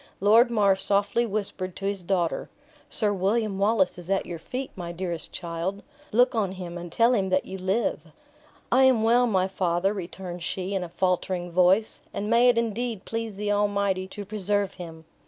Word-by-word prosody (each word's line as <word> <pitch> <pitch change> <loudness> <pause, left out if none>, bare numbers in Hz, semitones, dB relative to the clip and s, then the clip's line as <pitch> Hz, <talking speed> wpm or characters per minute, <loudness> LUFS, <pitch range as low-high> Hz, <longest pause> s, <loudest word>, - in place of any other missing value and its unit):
Lord 225 +5 +5
Mar 205 -4 +3
softly 200 +4 +1
whispered 195 -3 -4
his 200 -1 -2
daughter 175 -2 -1 0.4
"Sir 210 -2 0
William 200 +1 0
Wallace 200 -3 +2
is 175 0 -11
at 195 0 +1
your 170 -2 -6
feet, 255 +9 -5
my 175 -2 -5
dearest 175 -1 -5
child; 175 +3 -4 0.3
look 245 +3 +4
on 205 -5 0
him, 180 -2 -7
and 175 -1 -7
tell 230 +6 +4
him 195 -5 +1
that 185 0 +1
you 190 0 -7
live." 185 -3 -1 0.6
"I 260 - +5
am 250 -4 +4
well, 240 +2 +4
my 190 -4 +2
father," 185 0 0
returned 180 -2 -6
she, 185 +3 -3
in 190 -2 -1
a 175 - -7
faltering 180 0 -1
voice; 185 +5 +3 0.2
"and 210 +2 -2
may 240 +2 +6
it 240 - +3
indeed 230 -2 -2
please 225 -2 -4
the 205 +1 -2
Almighty 200 -2 +1
to 205 +2 -8
preserve 205 -1 -1
him!" 160 -2 -9
195 Hz, 180 wpm, -26 LUFS, 180-215 Hz, 0.6 s, may